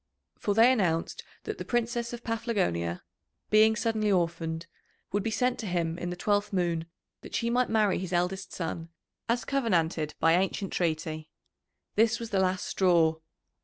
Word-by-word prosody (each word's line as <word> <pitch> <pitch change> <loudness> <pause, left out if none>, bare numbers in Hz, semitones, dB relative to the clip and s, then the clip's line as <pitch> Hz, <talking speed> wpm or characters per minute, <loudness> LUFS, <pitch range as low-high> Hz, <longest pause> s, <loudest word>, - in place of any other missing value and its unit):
For 205 - 0
they 230 +3 +7
announced 175 -9 0 0.2
that - - -5
the - - -3
Princess 235 0 -1
of 240 0 -7
Paphlagonia, 190 - -1 0.5
being 215 +1 +6
suddenly 220 -2 0
orphaned, 165 -2 0 0.5
would 205 - +1
be 225 - -1
sent 250 +2 0
to 220 - -4
him 170 -2 -1
in 175 - -3
the 175 - -3
twelfth 205 +3 0
moon 170 -4 0 0.3
that - - -8
she 235 0 0
might 250 +1 +2
marry 215 -3 +2
his 185 -1 -5
eldest 185 +2 -1
son 165 -1 -4 0.4
as 240 +1 +1
covenanted 170 - 0
by 165 - +4
ancient 190 +2 0
treaty. 155 -2 -2 0.6
This 225 +2 +3
was 230 -1 -6
the 195 - +2
last 185 -1 +1
straw. 170 -4 +3
190 Hz, 165 wpm, -29 LUFS, 165-225 Hz, 0.6 s, they